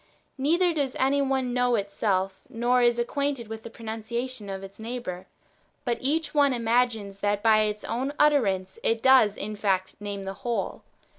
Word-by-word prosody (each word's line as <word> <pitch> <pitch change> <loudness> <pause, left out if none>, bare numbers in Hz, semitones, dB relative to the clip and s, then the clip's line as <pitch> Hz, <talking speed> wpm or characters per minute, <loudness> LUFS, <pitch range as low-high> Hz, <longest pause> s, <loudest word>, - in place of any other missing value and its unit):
Neither 335 +6 +2
does 280 -5 -1
any 275 +2 +2
one 265 -2 0
know^ 245 -2 +2
itself, 195 -1 -1
nor 245 0 +2
is 240 -1 +4
it 240 - +2
acquainted 280 -2 -2
with 220 0 -7
the 230 - -9
pronunciation 225 0 -5
of 195 0 -5
its 195 +2 -11
neighbour, 220 -6 -5 0.6
but 240 -2 0
each 305 +5 0
one 285 -3 +4
imagines 230 -4 0
that 205 0 0
by 220 -1 +5
its 210 0 -3
own 255 +5 -2
utter 290 -6 +4
ance 190 0 -3
it 225 0 0
does 260 -6 +6
in 210 +1 -4
fact 190 -2 0
name 205 -1 -5
the 195 0 -4
wdiole. 240 +2 -3
230 Hz, 175 wpm, -26 LUFS, 205-260 Hz, 0.6 s, does